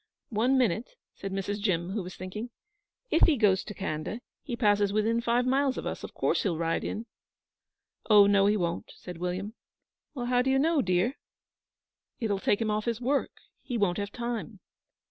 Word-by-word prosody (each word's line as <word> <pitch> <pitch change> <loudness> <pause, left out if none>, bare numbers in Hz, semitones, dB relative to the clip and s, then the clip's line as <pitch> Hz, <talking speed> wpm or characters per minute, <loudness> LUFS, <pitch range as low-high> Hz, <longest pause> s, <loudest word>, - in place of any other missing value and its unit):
'One 245 +4 +2
minute,' 245 - 0 0.2
said 195 - -6
Mrs. 195 +1 -2
Jim, 180 -3 0
who 210 +1 -2
was 180 0 -8
thinking. 210 +6 -6 0.6
'If 325 - +5
he 310 -5 +3
goes 205 -4 +3
to 210 - -8
Khanda, 190 +3 -3 0.2
he 255 -6 -4
passes 205 -4 +3
within 220 +3 +1
five 240 +1 +2
miles 265 +1 +2
of - - -4
us. - - -4
Of - - -8
course - - +1
he'll 175 -6 0
ride 165 0 0
in.' 220 - -4 1.0
'Oh, 205 -2 +8
no, 200 0 +4
he 210 +1 +3
won't,' 170 -3 -3
said 180 -2 -9
William. 185 +4 -3 0.6
'How 245 -1 +1
do 260 - 0
you 265 - +3
know, 310 +1 +3
dear?' 185 +7 +1 1.0
'It'll 210 -5 0
take 200 - +2
him 220 -2 0
off 210 0 -1
his 235 -2 -1
work. 270 +3 +1 0.3
He 245 - -3
won't 200 -3 +1
have 200 0 -3
time.' 235 -3 -4
210 Hz, 185 wpm, -28 LUFS, 195-245 Hz, 1.0 s, Oh